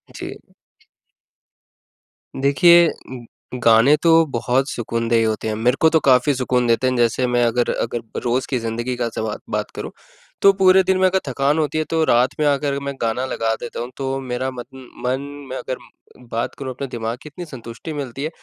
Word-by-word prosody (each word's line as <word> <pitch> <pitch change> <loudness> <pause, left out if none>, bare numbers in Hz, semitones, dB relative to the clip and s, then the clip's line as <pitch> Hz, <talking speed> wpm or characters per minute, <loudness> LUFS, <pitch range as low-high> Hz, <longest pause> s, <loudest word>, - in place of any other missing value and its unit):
जी। - - -7 2.0
देखिए 165 +5 +5 0.7
गाने 115 +6 +6
तो 165 0 +4
बहुत 125 +4 0
सुकूनदेह 115 -1 0
होते 110 0 -2
हैं। 110 - -1
मेरे 125 +4 +1
को 160 - +6
तो 160 - +3
काफ़ी 135 0 +4
सुकून 125 -1 0
देते 120 +2 +2
हैं, 130 - +1
जैसे 120 +1 +2
मैं 120 0 +2
अगर 120 +1 +1
अगर 115 0 -2 0.2
रोज़ 125 +1 0
की 130 - 0
ज़िंदगी 115 +2 -3
का 120 -1 -1
सबा 110 -1 -2
बात - - -3
करूँ - - -6 0.5
तो 200 - +7
पूरे 190 0 +5
दिन 190 0 +1
में 190 - +3
अगर 190 +1 +1
थकान 135 +3 +1
होती 155 0 -1
है 155 - +1
तो 165 -1 +1
रात 125 0 +3
में 150 - +2
आकर 140 0 +1
मैं 140 0 -4
गाना 115 +3 -1
लगा 115 -3 -1
देता 120 - -6
हूँ, 120 +2 -5
तो 135 0 -2
मेरा 130 0 -3
मत 125 -2 -8 0.4
मन 130 +2 0 0.3
में 130 - -4
अगर 130 - -4 0.5
बात 115 +1 -2
करूँ 130 -2 -5
अपने 135 +2 -5
दिमाग़ 115 -1 -4
की, 155 - -11
इतनी 175 +4 -8
संतुष्टि 125 +1 -8
मिलती 135 -2 -5
है। 155 - -1
130 Hz, 190 wpm, -20 LUFS, 120-145 Hz, 2.0 s, तो